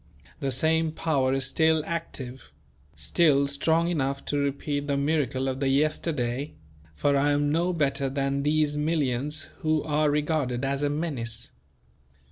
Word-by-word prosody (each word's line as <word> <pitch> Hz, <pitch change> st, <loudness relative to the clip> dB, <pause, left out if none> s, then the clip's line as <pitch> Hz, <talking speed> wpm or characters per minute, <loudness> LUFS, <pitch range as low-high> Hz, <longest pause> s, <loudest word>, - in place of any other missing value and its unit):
That 140 Hz, -, -1 dB
same 160 Hz, +5 st, +2 dB
power 140 Hz, -6 st, +1 dB
is 135 Hz, -1 st, +1 dB
still 160 Hz, +3 st, +2 dB
active; 135 Hz, -7 st, -5 dB, 0.4 s
still 145 Hz, -5 st, +3 dB
strong 160 Hz, +4 st, +1 dB
enough 140 Hz, -5 st, -1 dB
to 145 Hz, -, -1 dB
repeat 145 Hz, +1 st, -2 dB
the 140 Hz, -1 st, 0 dB
miracle 140 Hz, -3 st, 0 dB
of 130 Hz, 0 st, -2 dB
the 135 Hz, -, 0 dB
yesterday; 140 Hz, -2 st, 0 dB, 0.4 s
for 145 Hz, -, +1 dB
I 140 Hz, +1 st, +3 dB
am 145 Hz, 0 st, +1 dB
no 170 Hz, +3 st, +1 dB
better 140 Hz, -4 st, 0 dB
than 140 Hz, 0 st, -1 dB
these 150 Hz, 0 st, +1 dB
millions 150 Hz, -1 st, 0 dB, 0.2 s
who 155 Hz, -1 st, +1 dB
are 150 Hz, 0 st, +1 dB
regarded 145 Hz, -4 st, 0 dB
as 135 Hz, +1 st, -1 dB
a 145 Hz, -, +1 dB
menace. 145 Hz, -7 st, -3 dB
145 Hz, 145 wpm, -26 LUFS, 135-155 Hz, 0.4 s, still